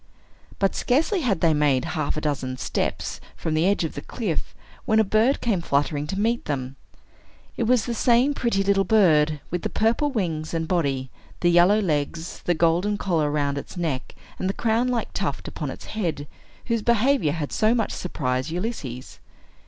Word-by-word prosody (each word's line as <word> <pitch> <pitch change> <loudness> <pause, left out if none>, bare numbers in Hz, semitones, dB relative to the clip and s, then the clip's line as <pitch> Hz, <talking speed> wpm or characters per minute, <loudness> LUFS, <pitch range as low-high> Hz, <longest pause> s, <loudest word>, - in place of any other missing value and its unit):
But 195 -1 +1
scarcely 325 - +1
had 210 - 0
they 165 -2 +4
made 145 -4 +2
half 155 -3 -1
a - - -2
dozen 135 -4 -2
steps - - -2
from 160 - -3
the 160 +3 +2
edge 200 -2 +2
of 160 - -3
the - - -6
cliff, 195 -10 -4 0.3
when 220 0 +3
a - - +6
bird 220 +6 +2
came 210 -7 +1
fluttering 145 0 0
to 195 +5 -3
meet 230 +3 0
them. 135 -2 -3 0.8
It 235 - -1
was 245 0 +3
the 240 - -2
same 245 +4 +3
pretty 235 -7 0
little 195 0 +3
bird, 155 -9 +3
with 175 0 -1
the - - -2
purple 230 +7 +1
wings 170 - -2
and 165 -1 -1
body, 135 -7 0 0.3
the 175 - +4
yellow 175 +5 +5
legs, 160 -2 -2
the 175 - +2
golden 175 +6 +2
collar 165 -7 0
round 145 -1 0
its 160 - -10
neck, 155 -7 -3 0.2
and 185 - -1
the - - 0
crown 230 +2 +1
like 245 -2 -2
tuft - - -3
upon - - -4
its - - -8
head, 165 -9 -3 0.4
whose 230 -2 0
behavior 235 - +2
had 155 -3 -4
so 220 +2 +2
much 225 -3 0
surprised 130 -5 -2
Ulysses. 160 - -5
175 Hz, 185 wpm, -24 LUFS, 150-220 Hz, 0.8 s, a